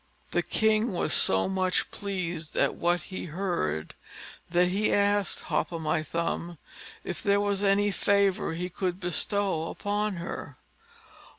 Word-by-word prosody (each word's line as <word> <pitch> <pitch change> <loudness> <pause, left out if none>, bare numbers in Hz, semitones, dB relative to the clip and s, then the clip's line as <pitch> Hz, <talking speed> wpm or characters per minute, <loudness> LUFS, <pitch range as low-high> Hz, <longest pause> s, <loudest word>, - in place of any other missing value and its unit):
The - - +2
king 220 0 +2
was 175 - 0
so 95 0 +3
much 185 -1 0
pleased 180 -5 -4
at - - +3
what 175 +1 +1
he 185 - -6
heard, 155 - -2 0.6
that 175 +1 +3
he 200 +3 +1
asked 205 -1 +2
Hop - - -1
o' 170 - -3
my 155 -1 0
thumb 170 +2 -3 0.5
if - - -4
there 200 -1 +3
was 200 -1 0
any 205 0 +3
favour 200 -3 +2
he 175 +2 -3
could 180 0 -3
bestow 180 -1 +1
upon 205 0 -1
her? 170 0 -6
185 Hz, 140 wpm, -28 LUFS, 170-200 Hz, 0.6 s, so